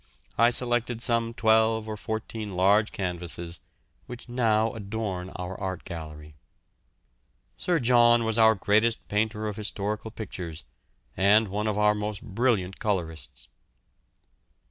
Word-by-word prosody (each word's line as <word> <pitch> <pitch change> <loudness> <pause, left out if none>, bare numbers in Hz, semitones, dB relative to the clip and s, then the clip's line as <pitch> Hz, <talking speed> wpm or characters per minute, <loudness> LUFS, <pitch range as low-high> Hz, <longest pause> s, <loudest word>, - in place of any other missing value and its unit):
I 115 +1 +5
selected 120 -1 0
some 115 -1 0
twelve 110 -1 +3
or 110 - -4
fourteen 110 -2 -5
large 100 +4 +3
canvases, 85 -2 -3 0.5
which 125 -1 -9
now 115 -2 +1
adorn 100 -4 -4
our 90 +1 -5
art 95 -2 -4
gallery. 75 -3 -8 1.2
Sir 175 -2 0
John 120 -2 +5
was 110 0 0
our 110 0 +6
greatest 110 +4 +1
painter 110 +1 0
of 105 - -5
historical 105 +1 -3
pictures, 90 - -7 0.5
and 100 +3 +4
one 105 +3 -2
of 105 -1 -1
our 105 0 +4
most 105 +1 -4
brilliant 105 -4 0
colourists. 85 - -4
105 Hz, 120 wpm, -27 LUFS, 95-115 Hz, 1.2 s, our